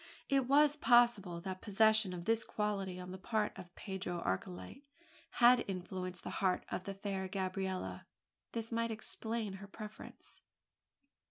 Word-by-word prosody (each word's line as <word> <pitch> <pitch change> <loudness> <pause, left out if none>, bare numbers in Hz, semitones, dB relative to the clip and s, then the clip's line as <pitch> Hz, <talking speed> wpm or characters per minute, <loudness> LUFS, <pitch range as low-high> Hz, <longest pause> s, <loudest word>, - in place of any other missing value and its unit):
It 270 -2 +3
was 290 +2 +5
possible 240 - +4
that 185 0 -5
the - - -19
possession 220 -1 +4
of 175 -1 -6
this 225 0 +2
quality 195 -3 -2
on 180 0 -7
the 185 - -7
part 215 +1 0
of 175 -1 -11
Pedro 190 -3 -4
Archilete 95 - -3 0.5
had 245 0 +6
influenced 185 -1 -4
the - - -5
heart 185 -2 +2
of 185 - -3
the 195 - -4
fair 195 -1 -3
Gabriella. 185 - -3 0.5
This 230 0 -3
might 230 0 0
explain 220 -1 -3
her 200 - -8
preference. 210 +1 -10
195 Hz, 150 wpm, -35 LUFS, 185-225 Hz, 0.5 s, had